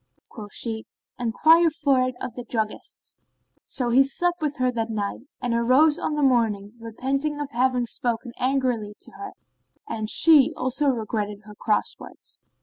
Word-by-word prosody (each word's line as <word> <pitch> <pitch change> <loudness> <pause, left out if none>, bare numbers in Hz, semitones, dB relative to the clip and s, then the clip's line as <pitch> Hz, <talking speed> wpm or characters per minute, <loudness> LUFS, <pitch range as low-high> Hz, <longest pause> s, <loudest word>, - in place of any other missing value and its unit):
Quoth 210 -3 -10
she, 220 -2 -2 0.3
"Enquire 320 +8 +4
for 280 -4 +1
it 255 0 -1
of 240 - -5
the 245 - -7
druggists." 220 -2 -5 0.5
So 245 -2 -1
he 260 +3 +6
slept 350 +5 +1
with 295 -2 -2
her 255 -1 +1
that 230 -2 -3
night 215 +4 -4 0.2
and 245 -1 0
arose 255 +7 +4
on 300 - -2
the 295 - 0
morrow, 220 -6 +1
repenting 270 +6 -3
of 290 -1 -4
having 250 0 +1
spoken 235 +1 -2
angrily 250 -5 0
to - - -11
her; 400 -1 -9 0.5
and 220 -1 -3
she 305 -2 +6
also 260 +3 0
regretted 215 -4 -2
her 210 0 -12
cross 210 +1 0
words. - - -9
250 Hz, 160 wpm, -24 LUFS, 225-275 Hz, 0.5 s, he